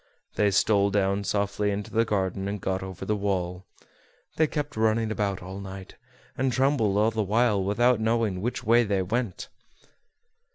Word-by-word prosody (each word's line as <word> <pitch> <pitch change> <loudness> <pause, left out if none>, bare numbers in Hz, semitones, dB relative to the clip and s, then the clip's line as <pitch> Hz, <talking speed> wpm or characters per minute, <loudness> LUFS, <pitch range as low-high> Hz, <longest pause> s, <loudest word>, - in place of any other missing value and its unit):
They 105 -1 +2
stole 100 +1 +3
down 100 0 +1
softly 100 0 0
into 100 0 -4
the 115 +1 +2
garden, 95 -2 -1
and 100 +1 -3
got 95 +1 -2
over 95 0 -7
the 105 - 0
wall. 95 -2 -2 0.7
They 155 - +3
kept 150 -1 -4
running 110 0 +1
about 100 -4 -2
all 95 +2 -7
night, 95 -1 -9 0.4
and 130 0 0
trembled 125 -6 +2
all 110 +2 +3
the 110 0 -1
while, 105 0 +2
without 120 +5 +2
knowing 110 -4 0
which 120 +4 -3
way 120 +2 +4
they 100 -3 0
went. 110 +1 -3
105 Hz, 165 wpm, -26 LUFS, 95-115 Hz, 0.7 s, way